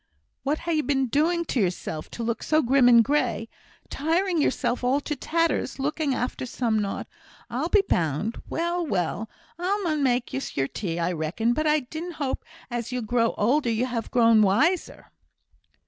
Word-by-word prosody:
"What 285 +3 0
ha' 340 - -5
ye 315 -2 +2
been 275 -2 +1
doing 340 +6 +1
to 270 - -1
yourself, 175 -5 -2
to 235 - -6
look 230 0 -2
so 310 0 +2
grim 255 0 +5
and 235 -1 +7
grey? 245 -4 0 0.4
Tiring 335 +3 +1
yourself 245 -3 0
all 260 +3 +2
to 300 - -3
tatters, 330 -2 0
looking 290 0 -1
after 250 +1 -3
some 230 -3 0
naught, 200 -1 -3 0.5
I'll - - -1
be 410 -2 +4
bound! 165 +7 -1
Well! 345 +1 -1
well! 210 - -2 0.3
I 385 +4 0
mun 310 -4 0
make 250 -2 +1
ye 270 - -1
your 135 0 +1
tea, 170 +1 -4
I 170 +1 0
reckon; 175 +8 0
but 310 +4 0
I 300 0 +3
did 320 +7 -6
hope 285 -4 -3 0.3
as 240 0 -3
you 250 -1 -2
grew 230 +1 +1
older 245 +5 +2
you'd 230 +3 0
ha' 230 -2 -3
grown 230 -2 +5
wiser!" 265 - +1
255 Hz, 180 wpm, -25 LUFS, 225-310 Hz, 0.5 s, and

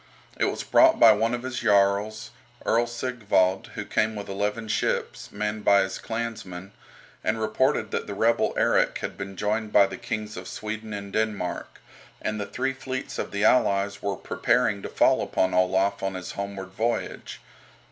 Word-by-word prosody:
It - - +3
was - - -2
brought 325 0 +5
by 115 - +9
one 115 +3 +2
of 120 - -7
his 130 -1 -3
jarls, 100 +2 +2 0.3
Earl 120 +1 +2
Sigvald, 115 -6 0
who - - -4
came 110 0 0
with 100 -1 -6
eleven 105 +3 -2
ships, - - -2
manned 105 +1 -3
by 100 0 +5
his 95 0 -5
clansmen, 110 -5 -5 0.5
and 110 - 0
reported 110 +1 +1
that - - -2
the 100 - -5
rebel 115 +3 +2
Erik - - +2
had - - -5
been 95 0 -7
joined 105 +2 -1
by 100 -1 +6
the - - -6
kings 110 -2 -4
of - - -7
Sweden 110 +1 -6
and 100 -1 -6
Denmark, 105 -5 -2 0.4
and 110 0 -3
the 100 - -4
three 130 +6 -2
fleets 130 0 -5
of - - -3
the 100 0 -2
allies 100 -4 +3
were 100 -1 -1
preparing 100 +3 +1
to - - -6
fall - - +3
upon 95 0 0
Olaf 95 +2 +2
on 95 -1 -2
his 90 -1 -6
homeward 100 -1 -5
voyage. 115 +5 -3
105 Hz, 175 wpm, -26 LUFS, 100-115 Hz, 0.5 s, by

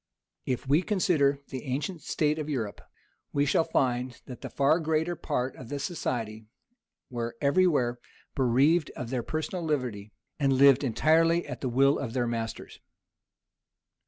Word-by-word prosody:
If 130 0 -2
we 145 +5 +4
consider 170 -9 +2
the 130 -2 -6
ancient 145 +6 -3
state 150 0 0
of 155 0 -4
Europe, 115 -8 -3 0.5
we 145 0 +2
shall 145 +3 +3
find, 125 -5 0
that 125 - -9
the - - -6
far 140 +4 +3
greater 160 +2 0
part 130 -4 -2
of 125 - -11
the 145 - -3
society 120 -8 -3 0.6
were 120 -1 -4
every 180 +7 +3
where 125 -7 +1 0.3
bereaved 140 +6 +3
of 125 -1 -6
their 125 -2 0
personal 160 +6 -3
liberty, 125 -10 -2 0.3
and 135 -2 +3
lived 140 +1 +6
entirely 165 +6 +3
at - - -7
the 130 - -1
will 135 +4 +3
of 115 -4 -4
their 125 -2 0
masters. 115 -1 -5
140 Hz, 155 wpm, -28 LUFS, 125-155 Hz, 0.6 s, lived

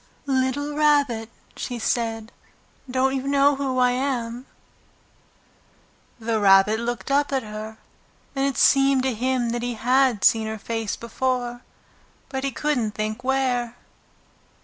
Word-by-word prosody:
"Little 275 +2 -1
Rabbit," 285 -7 +2 0.3
she 245 - -5
said, 225 -1 -2 0.6
"don't 260 +1 +1
you 270 0 -3
know 280 0 +4
who 270 -2 -2
I 250 -1 +4
am?" 250 -1 -3 1.7
The 225 -1 -1
Rabbit 200 +2 +5
looked 240 +3 -4
up 285 +1 +2
at 265 -2 0
her, 215 +1 -8 0.6
and 270 - 0
it 270 -4 -3
seemed 275 -1 +4
to 260 -1 0
him 250 +1 0
that 240 0 -2
he 245 0 -3
had 250 -2 +2
seen 220 -1 +4
her 220 0 -4
face 225 0 -3
before, 245 0 -3 0.7
but 265 -1 -4
he 275 - 0
couldn't 250 -6 -1
think 215 +3 -3
where. 255 -3 0
250 Hz, 135 wpm, -23 LUFS, 225-270 Hz, 1.7 s, Rabbit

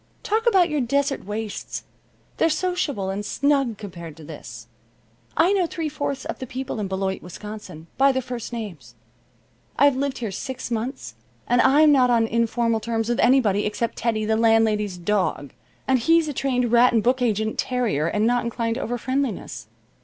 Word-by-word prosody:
Talk 450 +3 0
about 380 -6 +5
your 300 -2 0
desert 275 +1 0
wastes! 210 +1 -5 0.5
They're 325 - +3
sociable 300 - -1
and 200 +2 -3
snug 275 -1 +1
compared 170 -6 -9
to 160 - -12
this. 120 -7 -9 0.7
I 340 +5 +4
know 370 -4 +2
three 325 -2 -3
fourths 285 -2 -4
of - - -5
the 260 - -6
people 260 -1 -5
in 205 - -2
Beloit, 190 0 -2
Wisconsin, 210 -3 -9
by 275 +1 +6
their 260 - 0
first 245 -2 -6
names. 170 - -7 0.8
I've 285 0 +5
lived 275 0 -2
here 225 -4 -4
six 250 +4 -6
months 240 +4 -4 0.3
and 245 +1 +3
I'm 295 +3 +6
not 255 -3 +4
on 230 -2 +3
informal 230 0 +1
terms 225 0 -2
with 240 - 0
anybody 220 -6 +4
except 225 +2 -2
Teddy, 220 -2 0
the 220 +1 +1
landlady's 220 -4 +2
dog, 175 -7 -1 0.3
and 260 -1 +3
he's 330 +6 +3
a 295 - -3
trained 250 -3 0
rat 240 +1 +5
and 225 -2 +2
book 255 +1 +2
agent 220 -2 0
terrier, 230 - 0
and 210 +5 +1
not 245 +1 +2
inclined 230 0 -2
to - - -3
overfriendliness. 255 +1 -3
235 Hz, 175 wpm, -23 LUFS, 210-270 Hz, 0.8 s, by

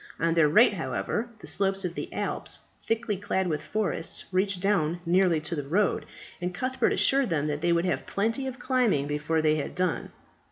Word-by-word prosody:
On 165 0 +2
their 165 -3 +4
right, 215 +7 +6
however, 210 +5 -2
the - - -9
slopes 195 -1 +1
of 175 - -3
the - - -6
Alps, - - -3 0.2
thickly 225 -2 -1
clad 190 -1 -1
with 155 -4 -1
forests, 215 -2 -1
reached 190 0 +1
down 175 -4 +1
nearly 175 -1 +3
to 155 - -2
the 145 - -2
road, 180 +9 0 0.3
and 180 0 -3
Cuthbert 255 +5 0
assured 270 -3 +2
them 155 -4 0
that 150 0 -2
they 175 +1 +2
would 170 +1 +2
have 180 - -1
plenty 230 +7 -1
of 260 0 -5
climbing 245 - +1
before 150 +2 -1
they 155 0 +3
had 145 - -4
done. 180 -2 -1
180 Hz, 195 wpm, -27 LUFS, 160-210 Hz, 0.3 s, right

